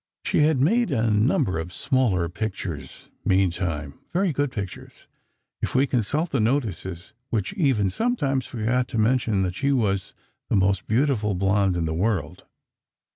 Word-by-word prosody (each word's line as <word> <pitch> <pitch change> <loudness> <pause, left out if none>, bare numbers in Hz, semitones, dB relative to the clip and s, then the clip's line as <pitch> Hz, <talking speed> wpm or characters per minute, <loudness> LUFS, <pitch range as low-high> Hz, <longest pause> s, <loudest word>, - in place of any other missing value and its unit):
She - - +1
had 150 -2 +4
made 225 - +3
a 115 -6 +1
number 105 - +2
of 85 +2 -5
smaller 105 -8 +1
pictures, 95 -4 -5 0.2
meantime—very 95 - 0
good 145 -1 0
pictures, 100 -6 -7 0.6
if - - -2
we 130 +2 +5
consult 140 - -1
the - - +1
notices, 105 - -2 0.2
which 105 -4 -1
even 130 - +2
sometimes 145 - 0
forgot 120 +2 0
to 115 - -4
remember 110 -3 +2
that 90 - -4
she 140 +4 0
was 105 -6 0 0.3
the - - +2
"most 95 0 +2
beautiful 110 -4 +1
blonde 95 0 +2
in 85 -2 0
the 80 - -1
world." 90 -2 -1
110 Hz, 145 wpm, -24 LUFS, 95-135 Hz, 0.6 s, we